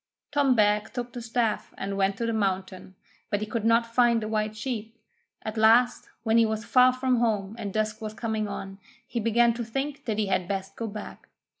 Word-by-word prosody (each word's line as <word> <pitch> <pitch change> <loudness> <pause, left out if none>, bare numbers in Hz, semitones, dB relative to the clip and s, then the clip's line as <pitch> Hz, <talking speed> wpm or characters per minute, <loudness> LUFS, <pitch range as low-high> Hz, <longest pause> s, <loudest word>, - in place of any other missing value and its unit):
Tom 285 -3 +3
Beg 210 0 +2
took 240 -1 -5
the 245 - -6
staff 230 -2 -1
and 195 +1 -3
went 195 0 +1
to 235 - -2
the 230 - -1
mountain, 190 -2 -2 0.3
but 205 -1 0
he 215 - -2
could 220 0 -3
not 230 +1 +4
find 240 -1 +4
the - - -3
white 215 0 -1
sheep. 225 -1 -5 0.5
At 220 0 -5
last, 230 +3 +4
when 225 0 +4
he 230 - +5
was 220 +1 -3
far 255 +1 +6
from 255 0 +1
home 215 -3 0
and 205 -3 -4
dusk 215 +1 -1
was 215 -1 -5
coming 220 -2 -2
on, 195 -1 -7 0.3
he 240 - -3
began 235 +1 +3
to 235 +1 -4
think 270 +5 -4
that 220 -3 -1
he 215 - +1
had 185 -2 0
best 195 0 -4
go 230 - -4
back. 210 0 -9
220 Hz, 210 wpm, -27 LUFS, 210-235 Hz, 0.5 s, far